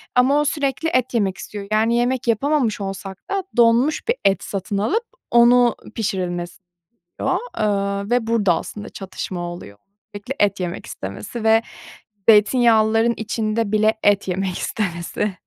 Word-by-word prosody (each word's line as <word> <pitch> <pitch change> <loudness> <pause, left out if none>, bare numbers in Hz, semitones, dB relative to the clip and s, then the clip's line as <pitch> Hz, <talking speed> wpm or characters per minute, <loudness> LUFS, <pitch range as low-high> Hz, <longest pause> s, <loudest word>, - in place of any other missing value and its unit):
ama 260 +4 +4
o - - -1
sürekli 290 +1 -1
et 255 -4 0
yemek 195 -5 0
istiyor. 205 -1 -8
Yani, 220 +2 +2
yemek 245 +1 0
yapamamış 235 -2 +1
olsak 195 0 -5
da 395 -1 0
donmuş 240 - +3
bir 470 - +2
et 195 -2 +2
satın 200 +1 -4
alıp 365 - 0 0.3
onu 240 0 +5 0.2
pişirilmesini 180 -4 -3 0.5
istiyor, - - -1 0.2
eee, 200 -1 -1
ve 245 -2 +1
burada 215 -6 +3
aslında 210 +6 -6
çatışma 185 -1 -6
oluyor. 175 - -7 0.4
Sürekli 205 +7 -6
et 200 -1 +2
yemek 180 -1 -4
istemesi 100 - -7
ve 225 0 +5 0.7
zeytinyağlıların 225 0 +4
içinde 220 -1 -2
bile 215 0 +3
et 205 -1 +3
yemek 185 0 -2
istemesi. 190 0 -2
215 Hz, 140 wpm, -21 LUFS, 195-240 Hz, 0.7 s, onu